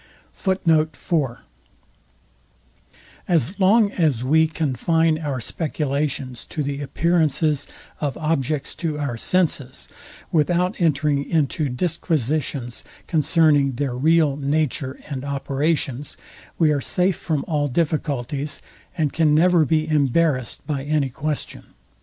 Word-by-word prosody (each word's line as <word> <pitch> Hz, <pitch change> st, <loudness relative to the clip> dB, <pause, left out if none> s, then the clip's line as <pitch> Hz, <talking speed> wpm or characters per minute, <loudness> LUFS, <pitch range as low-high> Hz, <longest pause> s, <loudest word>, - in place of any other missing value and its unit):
As 175 Hz, +3 st, +1 dB
long 200 Hz, +2 st, +4 dB
as 150 Hz, -, +1 dB
we 160 Hz, +5 st, +4 dB
confine 160 Hz, +2 st, +1 dB
our 145 Hz, -5 st, -3 dB
speculations 140 Hz, -2 st, -2 dB
to 150 Hz, -, -4 dB
the 140 Hz, 0 st, -3 dB
appearances 155 Hz, -1 st, +1 dB, 0.3 s
of 145 Hz, -4 st, -2 dB
objects 155 Hz, -2 st, -1 dB
to 160 Hz, -4 st, -3 dB
our 140 Hz, -5 st, -2 dB
senses, 140 Hz, -2 st, 0 dB, 0.4 s
without 180 Hz, +4 st, +1 dB
entering 150 Hz, -3 st, +2 dB
into 150 Hz, -1 st, 0 dB
disquisitions 145 Hz, -4 st, -1 dB, 0.2 s
concerning 150 Hz, -3 st, +3 dB
their 130 Hz, 0 st, -2 dB
real 155 Hz, +1 st, +3 dB
nature 140 Hz, -1 st, -1 dB
and 135 Hz, -3 st, -5 dB
operations, 140 Hz, 0 st, -1 dB, 0.4 s
we 160 Hz, -3 st, +4 dB
are 145 Hz, -2 st, 0 dB
safe 180 Hz, +4 st, +2 dB
from 155 Hz, -5 st, -2 dB
all 150 Hz, -3 st, 0 dB
difficulties, 145 Hz, -1 st, -1 dB, 0.4 s
and 155 Hz, -4 st, 0 dB
can 155 Hz, -2 st, +3 dB
never 170 Hz, 0 st, +4 dB
be 155 Hz, +2 st, +1 dB
embarrassed 145 Hz, -3 st, +1 dB
by 145 Hz, -3 st, -2 dB
any 145 Hz, -1 st, 0 dB
question. 150 Hz, +3 st, -5 dB
150 Hz, 105 wpm, -22 LUFS, 140-160 Hz, 0.4 s, long